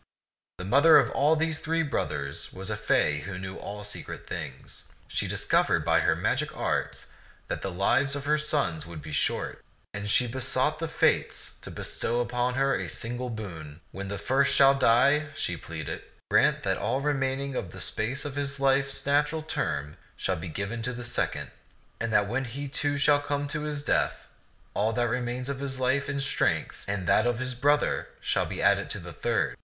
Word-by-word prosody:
The 90 - -6
mother 140 +10 +7
of 145 +5 +3
these 160 0 0
three 165 +1 0
brothers 70 - -3
was 95 0 -5
a - - 0
fay 75 0 +2
who 90 +5 -6
knew 95 0 -6
all 105 0 -7
secret 105 - -7
things. 75 -6 -6 0.2
She - - -2
discovered - - +2
by - - +4
her - - +3
magic - - -1
arts - - -2 0.4
that - - -3
the 95 - -2
lives 130 +10 +2
of 145 0 -4
her 150 +1 +3
sons 140 - 0
would 80 -3 -8
be 80 - -8
short, 75 - 0 0.3
and 100 +1 -4
she 125 - +4
besought 130 +4 0
the 165 - -2
Fates 160 - +1
to - - -8
bestow 120 - -2
upon 125 +1 0
her 135 +1 +2
a - - -3
single 120 +2 -3
boon. 85 -9 -7
" - - -36
When 100 0 -6
the 100 +1 -3
first 135 +7 +3
shall 135 0 +7
die," 135 +3 +4
she 90 - -1
pleaded, 80 -3 -5 0.3
"grant - - +4
that - - 0
all 130 - 0
remain 135 -2 0
ing 140 -1 -4
of 95 - -3
the - - -10
space 125 +7 -2
of 145 -2 -4
his 140 0 -2
life's 135 0 +2
natural 150 +2 +2
term 75 - -2 0.2
shall 95 - 0
be 90 +1 -6
given 100 +8 -3
to 125 +2 -2
the 120 0 -6
second; 120 - -2 0.5
and 115 -1 -2
that 105 -1 +4
when 130 +5 -1
he, 140 +4 -5
too, 145 +1 -1
shall 145 0 +5
come 145 0 -2
to 150 - -2
his 145 -1 -3
death, - - 0 0.5
all 110 +2 +1
that 120 0 +1
remains 125 +1 -2
of 140 -1 -3
his 135 -1 -3
life 130 +2 +1
and 140 -1 -1
strength - - 0
and 100 -2 -2
that 105 - +4
of 120 -1 +1
his 130 +1 -2
brother 145 +4 +2
shall - - 0
be - - -4
added - - +3
to - - -1
the - - -9
third.' - - 0
125 Hz, 195 wpm, -28 LUFS, 100-140 Hz, 0.5 s, mother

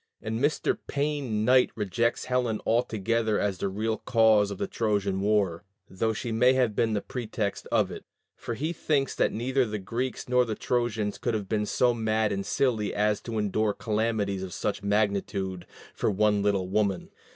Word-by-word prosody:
And 110 +1 -3
Mr. 145 +4 +1
Payne 140 -7 -1
Knight 130 +1 +5
rejects 115 +3 0
Helen 125 -4 0
altogether 115 -1 +1
as 100 -3 -1
the - - 0
real 110 +3 -1
cause 110 -4 +4
of 100 - -5
the - - -1
Trojan 100 -4 -1
war, 100 -5 +1 0.2
though 110 +4 -1
she 115 +2 -4
may 125 +3 +4
have 125 -5 +1
been 110 +1 +1
the 105 - -1
pretext 110 -4 -4
of - - +2
it; - - -8 0.3
for 120 - -5
he 155 +8 -2
thinks 145 -4 0
that - - +1
neither 130 +4 +1
the 110 -3 -3
Greeks 120 +6 -4
nor 125 0 +4
the 110 -3 -3
Trojans 115 -4 -1
could 115 - -1
have 105 -3 -3
been 105 -1 -1
so 125 +2 +3
mad 110 -2 0
and 100 -1 -3
silly 110 -6 0
as 105 0 +1
to 115 -2 -5
endure 105 0 +1
calamities 105 -3 -1
of 95 -2 -6
such 105 - -2
magnitude 100 -3 -1 0.3
"for - - 0
one 105 0 +2
little 100 -2 +1
woman." 100 -1 0
110 Hz, 180 wpm, -27 LUFS, 100-120 Hz, 0.3 s, Knight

